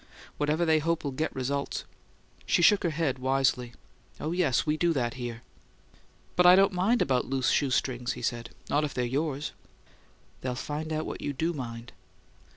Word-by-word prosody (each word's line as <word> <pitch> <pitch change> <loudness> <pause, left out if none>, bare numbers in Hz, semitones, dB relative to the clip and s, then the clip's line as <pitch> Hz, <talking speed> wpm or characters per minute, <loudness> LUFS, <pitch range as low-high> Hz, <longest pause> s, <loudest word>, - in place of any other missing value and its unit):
Whatever 150 +3 +1
they 160 -1 +4
hope 165 +1 -1
will 140 - -2
get 155 +4 -2
results." 140 +2 -2 0.6
She 175 - +3
shook 205 +3 +6
her 175 - +1
head 150 -5 -1
wisely. 130 -2 +1 0.5
"Oh, 155 - -3
yes; 170 -9 +2
we 150 0 +1
do 170 +1 +2
that 120 -5 -1
here!" 120 -2 -6 0.9
"But 180 0 +5
I 180 - +10
don't 195 +1 +4
mind 195 +5 +2
loose 130 0 +1
shoe 140 - +2
strings," 125 -1 0
he - - -8
said. 115 0 -2 0.2
"Not 145 +2 +1
if 145 - -3
they're 125 - 0
yours." 140 +3 -2 0.9
"They'll 125 -1 -2
find 150 +4 -4
out 155 0 -1
what - - -6
you 145 - -2
do 165 +5 -1
mind." 115 -4 -6
140 Hz, 175 wpm, -28 LUFS, 125-160 Hz, 0.9 s, I